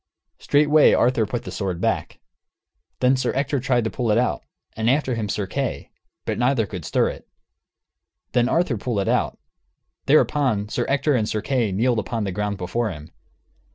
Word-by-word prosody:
Straightway 150 +1 +4
Arthur 120 -3 +2
put 120 +2 -4
the - - -7
sword 95 -4 -3
back. - - -2 0.8
Then 130 +1 +4
Sir 130 -1 0
Ector 140 +1 0
tried 125 -1 +1
to 110 - -2
pull 120 -3 -2
it 105 - +3
out, 120 - 0 0.3
and 110 +1 0
after 135 -1 +1
him 110 -3 -3
Sir 105 -1 -1
Kay; 135 +5 -4 0.3
but - - -2
neither 125 -2 +2
could 90 -6 -7
stir - - +1
it. - - -9 1.0
Then 120 0 +2
Arthur 160 -6 +1
pulled 105 -1 -2
it 95 - -3
out. - - 0 0.7
Thereupon, 135 -8 +2
Sir 120 - -2
Ector 140 +2 +2
and 110 -4 0
Sir 105 - -2
Kay 125 -7 0
kneeled 115 +4 +1
upon 115 0 -3
the 100 - -2
ground 105 +2 -2
before 110 +6 -2
him. 75 -4 -9
120 Hz, 180 wpm, -23 LUFS, 105-130 Hz, 1.0 s, Straightway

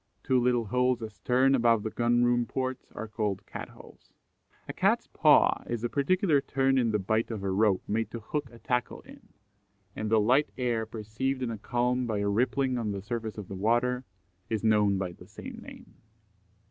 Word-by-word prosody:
Two 130 -1 +2
little 120 -1 +2
holes 125 +2 +1
astern, 125 +5 +1
above 115 -4 +3
the 110 - -3
Gun 120 0 +2
room 120 -1 +2
ports, 130 +1 -4
are 110 - -5
called 105 -3 -3
Cat - - -7
holes. - - -17 0.6
A - - -5
Cat's - - +2
paw - - +4
is 120 -1 -3
a 120 - 0
particular 150 - +2
turn 135 -1 +1
in 120 -2 +2
the 105 - +1
bight 110 +3 0
of 110 -4 -5
a 95 - -1
rope 100 -1 +2
made 110 +2 -1
to 115 - -6
hook 135 +5 -4
a 115 - -13
tackle 125 0 -2
in; - - -16 0.7
and 110 - -3
the 110 0 +4
light 130 +8 +3
air 120 -3 -1
perceived 115 +5 -3
in 120 - -2
a 110 - -4
calm 125 +2 0
by 110 -2 -1
a 100 0 0
rippling 125 +4 +1
on 110 -3 -2
the 100 -1 -6
surface 110 0 -4
of 105 -3 -7
the - - -7
water, 120 +6 +1 0.5
is 110 -1 -2
known 105 -3 +3
by 95 -2 -3
the - - -15
same - - -9
name. - - -13
115 Hz, 200 wpm, -28 LUFS, 110-125 Hz, 0.7 s, paw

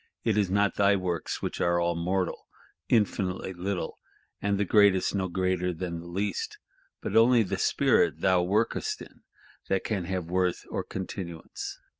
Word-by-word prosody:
it 110 -3 +2
is 105 -3 +2
not 100 +1 +2
thy 100 0 +5
works, 90 -3 -3
which - - -3
are 85 0 +2
all 85 0 +1
mortal, 90 +2 -2 0.4
infinitely 95 -4 +1
little, 90 +1 -3 0.4
and 100 0 +1
the 100 - +1
greatest 100 -2 +4
no 95 -2 0
greater 90 0 0
than 85 0 -4
the 85 - -10
least, 95 +2 -3 0.5
but - - -3
only 115 +1 +6
the 95 - -3
Spirit - - +3
thou 95 -1 +4
workest 105 +6 0
in, - - -16 0.5
that 95 - +1
can 100 -5 -2
have 95 -1 -2
worth 90 +1 0
or - - -2
continuance. 90 -3 -6
95 Hz, 160 wpm, -28 LUFS, 90-100 Hz, 0.5 s, only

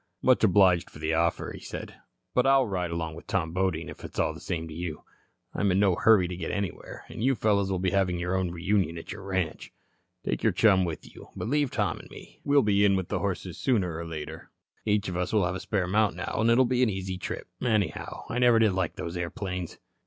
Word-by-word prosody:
"Much 130 -2 +4
obliged 95 -4 +5
for - - -13
the 80 +1 -1
offer," 85 +1 0
he - - -8
said, - - -7 0.4
"but 125 +1 +3
I'll 135 -1 +5
ride 90 -5 -2
along 80 -1 -3
with 85 - -11
Tom 85 -4 0
Bodine, 90 -3 0
if - - -10
it's - - -9
all - - +1
the - - -10
same 80 -1 -3
to 80 - -8
you. 80 -1 -5 0.5
I'm 100 -1 +1
in 95 - +2
no 100 -2 +4
hurry 105 0 +5
to 90 - -5
get 85 -2 -4
anywhere, 100 -3 -4
and 110 - -6
you 135 +1 +3
fellows 100 -3 +2
will 95 - 0
be 90 0 0
having 95 -3 +1
your 90 +2 -1
own 95 -1 0
reunion 85 0 0
at 80 - -8
your 100 +2 -7
ranch. 95 -3 -3 0.5
Take - - -1
your - - +2
chum 95 -4 +4
with 80 -3 -6
you, - - -13
but - - -4
leave 145 0 +2
Tom 100 -9 -1
and - - -13
me. - - -13
We'll 140 -1 +4
be 100 -1 +3
in 100 -1 +5
with 95 -2 -2
the - - -1
horses - - -3
sooner 95 -10 +1
or 85 +1 -5
later. 80 -2 -7 0.4
Each 105 -2 +1
of 90 - -3
us 90 0 -1
will 105 -4 +3
have 90 - -1
a 95 - -4
spare 95 -3 -1
mount 105 +3 +2
now, - - -4
and 115 - +3
it'll 125 +3 +5
be 125 +1 +1
an 125 - +4
easy 95 -2 -4
trip. - - -5
Anyhow, 105 -8 -1
I 125 - -2
never 120 -2 +5
did 110 -2 +4
like 90 -2 -1
those 85 +1 -5
airplanes." 90 0 -4
95 Hz, 240 wpm, -28 LUFS, 85-105 Hz, 0.5 s, obliged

